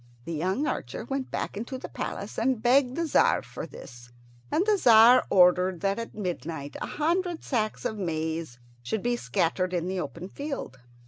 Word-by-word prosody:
The 170 - -4
young 185 - 0
archer 220 - -4
went 270 +1 -3
back - - -3
into 235 +5 -5
the - - -7
palace 200 - -5
and 250 +1 +1
begged 250 +2 +3
the 335 - 0
Tzar 315 - +3
for - - -7
this, 120 0 -12 0.4
and 360 - +2
the 425 -1 +4
Tzar 240 - +7
ordered 180 -1 +4
that 195 +2 0
at 230 - -7
midnight 165 -7 -5
a - - -3
hundred 345 +2 -1
sacks 215 -5 -2
of 215 - -2
maize 160 -5 -3 0.2
should 190 - -3
be 240 0 +1
scattered 180 - 0
in 175 0 -1
the 190 0 -2
open 175 0 -5
field. 275 - -6
205 Hz, 180 wpm, -27 LUFS, 170-255 Hz, 0.4 s, Tzar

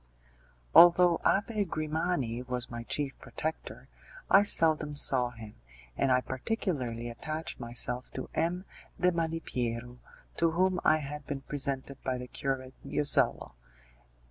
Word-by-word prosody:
Although 175 0 +7
Abbé 210 +2 +2
Grimani 155 - -2
was 125 -1 -4
my 120 0 -5
chief 135 +3 -3
protector, 160 +1 -6 0.4
I 195 - +8
seldom 155 -6 +2
saw 130 -3 +1
him, 115 -3 -11 0.4
and 135 - +1
I 125 0 +4
particularly 130 - -3
attached 155 +7 -5
myself 120 +1 -3
to 130 - -5
M. 180 +3 -1 0.3
de 180 0 +4
Malipiero, 125 -8 -3 0.4
to 165 - +3
whom 185 +1 +2
I 155 - +5
had 150 -1 -7
been 140 -2 -4
presented 140 -1 0
by 130 -1 -1
the 125 - -6
Curate 130 -1 -3
Josello. 145 -1 +1
145 Hz, 125 wpm, -30 LUFS, 125-165 Hz, 0.4 s, I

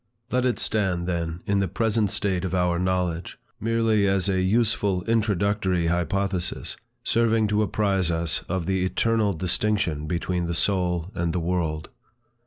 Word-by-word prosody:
Let 125 0 +1
it 125 - 0
stand, 95 -5 0
then, 85 -1 -2
in 100 0 +1
the 95 - +1
present 105 +2 0
state 95 -2 -1
of 95 0 -2
our 90 -1 +1
knowledge, 90 -2 -1 0.2
merely 115 -2 +2
as 95 -1 +1
a 95 -2 +1
useful 100 -2 +1
introductory 100 -5 +1
hypothesis, 90 +2 -1 0.3
serving 115 -2 +2
to 105 +1 +2
apprize 100 -4 +1
us 80 -1 0
of 90 -1 -1
the 95 0 0
eternal 110 +2 +1
distinction 90 -3 0
between 85 +1 -1
the 85 - -1
soul 90 -1 0
and 85 -3 -1
the 90 - 0
world. 80 -3 -2
95 Hz, 150 wpm, -25 LUFS, 85-105 Hz, 0.3 s, merely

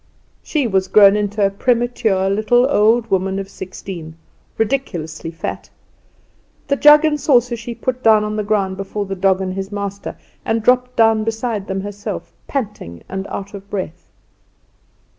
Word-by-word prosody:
She 300 -4 -1
was 190 -4 +1
grown 200 0 +7
into 205 0 0
a 195 - +1
premature 230 -3 +1
little 215 +5 +3
old 230 -2 +3
woman 190 0 +1
of 195 -1 -4
sixteen, 180 -4 -8 0.4
ridiculously 175 - -2
fat. 165 - -6 1.0
The 280 - +3
jug 295 +2 +7
and 300 -1 +1
saucer 245 -3 +3
she 235 +1 -7
put 255 +1 -3
down 220 -2 +5
on 210 0 -3
the 215 - -1
ground 200 -2 0
before 200 +1 -4
the 195 - -4
dog 190 0 +2
and 185 -1 -3
his 195 +1 -5
master 200 -1 -5 0.3
and 225 -1 -1
dropped 250 +1 +2
down 225 -1 +4
beside 225 -2 -3
them 190 0 -2
herself, 205 +1 -6
panting 205 - -5
and 190 +1 -4
out 200 +1 -6
of 200 0 -10
breath. 180 -3 -5
205 Hz, 160 wpm, -19 LUFS, 190-235 Hz, 1.0 s, grown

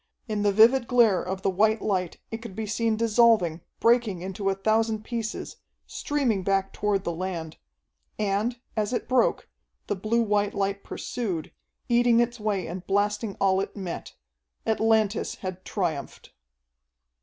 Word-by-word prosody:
In 215 -2 -1
the 205 0 +3
vivid 235 +4 +5
glare 230 -6 +4
of 190 +1 -5
the - - +2
white 215 +4 +3
light 185 -4 -1
it 225 0 -5
could 230 -5 -9
be 220 +1 -3
seen 220 +1 0
dissolving, 220 -7 +3 0.2
breaking 230 -6 +2
into 195 +1 -2
a 195 - 0
thousand 220 +2 +1
pieces, 230 -1 -4 0.3
streaming 265 -9 -1
back 195 0 0
toward 205 -2 0
the 170 - -2
land. 170 -2 -5 0.6
And, 215 +4 0 0.2
as 215 +1 -1
it 240 - -2
broke, 255 -2 +2 0.4
the - - -1
blue 220 +5 +1
white 205 -1 0
light 200 0 -1
pursued, 190 -10 -4 0.4
eating 240 -1 +4
its 240 0 0
way 205 -4 -1
and 180 +2 -6
blasting 205 +1 0
all 190 -1 +3
it 200 - -6
met. 185 -4 -6 0.5
Atlantis 220 -1 +1
had 185 -1 -6
triumphed. 165 -8 -4
210 Hz, 150 wpm, -26 LUFS, 190-225 Hz, 0.6 s, vivid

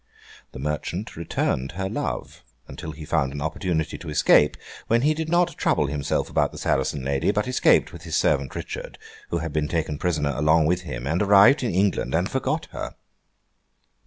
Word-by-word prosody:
The - - -8
merchant 75 +8 -4
returned 75 -4 -2
her 95 +2 -3
love, - - -4 0.2
until 80 - -8
he 80 0 -9
found 75 -4 0
an 70 - -6
opportunity 80 +1 -2
to 85 - -8
escape, 75 -1 +4 0.3
when 115 +2 +2
he 155 +2 +4
did 160 0 -4
not 175 +1 +2
trouble 75 - +2
himself 70 0 -1
about - - +1
the - - -10
Saracen 70 -3 0
lady, 70 +3 0
but 105 +3 0
escaped 125 - +3
with 85 - -10
his 80 -2 -4
servant 70 -1 +1
Richard, - - -6 0.3
who 85 - 0
had 80 -2 -4
been 75 -1 0
taken 75 -3 -2
prisoner 75 -5 0
along 75 +3 +3
with 90 +3 +1
him, 60 -8 -6
and 80 +5 0
arrived 100 +7 +6
in 115 -8 -1
England 95 0 +1
and - - +1
forgot - - -1
her. - - -6
80 Hz, 185 wpm, -24 LUFS, 75-95 Hz, 0.3 s, arrived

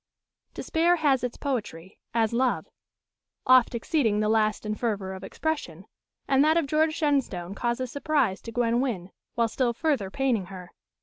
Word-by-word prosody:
Despair 340 +2 +2
has 285 -6 +2
its 245 -1 -3
poetry, 210 -9 -4
as 225 -1 +1
love; 250 +1 +1 0.8
oft 255 -2 +5
exceeding 230 -4 +1
the 215 0 +1
last 215 -1 +1
in 210 - -1
fervour 205 -4 -2
of 190 0 -9
expression, 195 - -4 0.4
and 270 0 +4
that 315 +2 +4
of 335 - +2
George 310 +2 +1
Shenstone 265 - -1
causes 240 +3 -2
surprise 285 -9 0
to 230 - -8
Gwen 240 +1 +1
Wynn, 195 -9 -3 0.2
while 235 -1 +2
still 240 +1 0
further 265 -7 0
paining 240 -5 0
her. 180 -2 -10
235 Hz, 160 wpm, -26 LUFS, 210-280 Hz, 0.8 s, oft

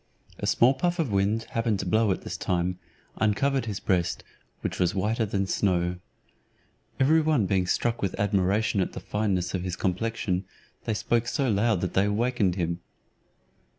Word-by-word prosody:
A - - -2
small 125 +3 +5
puff 175 +6 -1
of 155 - -1
wind 100 +3 +1
happening 115 -2 0
to 95 - -4
blow 110 +4 +2
at 95 - -1
this - - -5
time, 90 0 -1 0.4
uncovered 130 +5 +1
his 100 -3 -3
breast, 90 -4 0 0.4
which - - -3
was 90 0 +1
whiter 110 +4 0
than 100 -1 0
snow. 90 -2 0 1.0
Every 155 +5 +5
one 150 -9 +2
being 95 -1 +1
struck 120 +4 0
with 100 - -2
admiration 100 +1 +1
at - - -2
the - - -5
fineness 100 -4 -1
of 95 - -1
his 90 -1 -3
complexion, 95 -1 -1 0.4
they 110 - 0
spoke 120 +2 0
so 135 -2 0
loud 105 -2 +2
that 90 - -2
they 95 - +3
awaked 120 +5 0 0.2
him. 85 -2 -2
105 Hz, 170 wpm, -27 LUFS, 95-115 Hz, 1.0 s, small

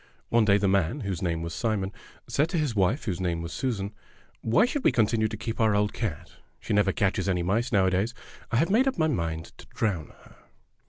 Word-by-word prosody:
One 115 -1 +4
day 100 -1 +5
the 100 -1 +1
man, 95 - +1
whose 95 -6 -3
name 85 -2 -1
was 85 0 -5
Simon, 105 -4 -1 0.4
said 150 +4 +1
to 175 - -1
his 150 -7 0
wife, 105 +9 +1
whose 95 -5 -2
name 85 -2 -1
was 85 - -6
Susan: 110 -6 -2 0.5
"Why 115 - +4
should 265 +2 -2
we - - +5
continue 110 -1 +2
to 110 - -6
keep 115 +2 -5
our 110 -2 +4
old 105 0 +1
cat? 100 -11 -5 0.2
She - - -3
never 100 -2 +3
catches 100 +1 0
any 90 -2 +1
mice 115 +8 0
nowadays. 95 +3 +2 0.4
I - - 0
have 165 +8 +2
made 250 +6 +4
up 265 - 0
my 155 - +3
mind 80 - -3
to - - -13
drown 95 -8 -2
her. - - -19
105 Hz, 220 wpm, -27 LUFS, 95-120 Hz, 0.5 s, day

